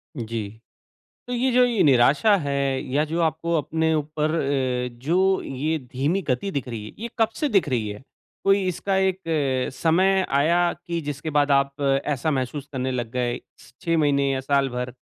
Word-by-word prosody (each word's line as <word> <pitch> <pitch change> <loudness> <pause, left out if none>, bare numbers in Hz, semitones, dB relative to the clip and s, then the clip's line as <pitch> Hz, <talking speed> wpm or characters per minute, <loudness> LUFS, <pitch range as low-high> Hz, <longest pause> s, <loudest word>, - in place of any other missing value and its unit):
जी। 110 -3 -5 0.7
तो 250 - -3
ये 250 +2 +1
जो 250 - +6
ये 235 -3 +1
निराशा 140 - +5
है 140 -1 0
या 150 +2 +3
जो 165 +2 -2
आपको 165 +1 0
अपने 160 +1 0
ऊपर 155 0 -1
अ, 130 -4 0 0.2
जो 190 +5 +2
ये 150 +5 -2
धीमी 145 +9 0
गति 130 +10 0
दिख 140 -5 -3
रही 115 -3 -6
है, - - -9
ये 235 +1 -5
कब 225 -1 +4
से 295 +3 -1
दिख 195 -8 +2
रही 115 -5 0
है? 105 0 -7 0.4
कोई 195 0 +3
इसका 190 +2 -1
एक 190 -1 +1 0.5
समय 190 +6 +3 0.2
आया 170 +4 +3
कि 170 -1 -5
जिसके 145 +1 -5
बाद 145 -1 +2
आप 140 +1 +1
ऐसा 140 +2 0
महसूस 135 +1 -3
करने 130 -1 -2
लग 120 -3 -3
गए, 120 -1 -1 0.2
स - - -18
6 165 -2 +1
महीने 140 -2 +2
या 135 - -1
साल 140 0 +1
भर। 125 0 -4
145 Hz, 185 wpm, -24 LUFS, 130-170 Hz, 0.7 s, जो